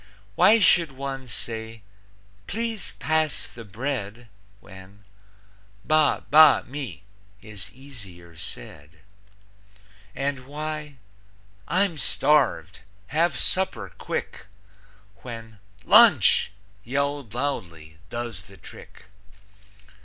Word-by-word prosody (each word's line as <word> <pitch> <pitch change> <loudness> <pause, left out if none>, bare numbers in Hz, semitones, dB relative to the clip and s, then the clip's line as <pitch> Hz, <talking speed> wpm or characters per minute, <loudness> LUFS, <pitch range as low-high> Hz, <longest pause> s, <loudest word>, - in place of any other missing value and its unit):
Why 225 - +6
should 170 -7 +4
one 135 -1 -6
say, 110 -1 -6 0.6
"Please 225 0 -4
pass 155 -3 0
the 115 - -11
bread," 115 0 -5 0.3
When 95 0 -15 0.8
"Ba 155 -1 +3
ba 155 -1 +8
me" 120 - -7 0.4
is 105 -4 -9
easier 100 - -12
said? 75 0 -8 1.1
And 135 -2 -3
why 150 0 -5 0.7
"I'm 185 -3 +1
starved. 135 - +2 0.3
Have 160 -2 +1
supper 190 +9 0
quick," - - -5 0.7
When 115 -3 -10 0.3
"LUNCH!" - - +6 0.3
yelled 140 -2 -2
loudly, 85 - -4
does 120 -7 -6
the 100 0 -15
trick? - - -14
125 Hz, 85 wpm, -25 LUFS, 100-150 Hz, 1.1 s, ba